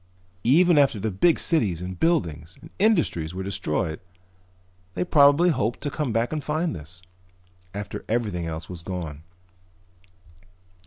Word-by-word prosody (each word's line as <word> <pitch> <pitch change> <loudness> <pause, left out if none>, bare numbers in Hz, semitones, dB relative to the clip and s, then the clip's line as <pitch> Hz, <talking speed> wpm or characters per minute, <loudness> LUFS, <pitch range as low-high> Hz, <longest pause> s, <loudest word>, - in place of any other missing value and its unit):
Even 165 +5 +5
after 135 -7 +3
their 110 +2 -2
big 160 - +3
cities 105 - +1
and 90 0 -6
buildings 85 - 0
and - - -14
industries 165 - +1
were 95 - -4
destroyed 80 -4 -2 1.0
they - - 0
probably 150 +1 +5
hoped 120 -7 0
to 145 0 -3
come 145 -3 -2
back 115 +5 0
and 155 -2 -3
find 160 +3 -1
this. 85 +3 -9 0.7
After 100 +1 -6
everything 105 -7 -1
else 80 +2 -5
was 90 -2 -8
gone." 85 -5 -6
105 Hz, 140 wpm, -24 LUFS, -, 1.0 s, Even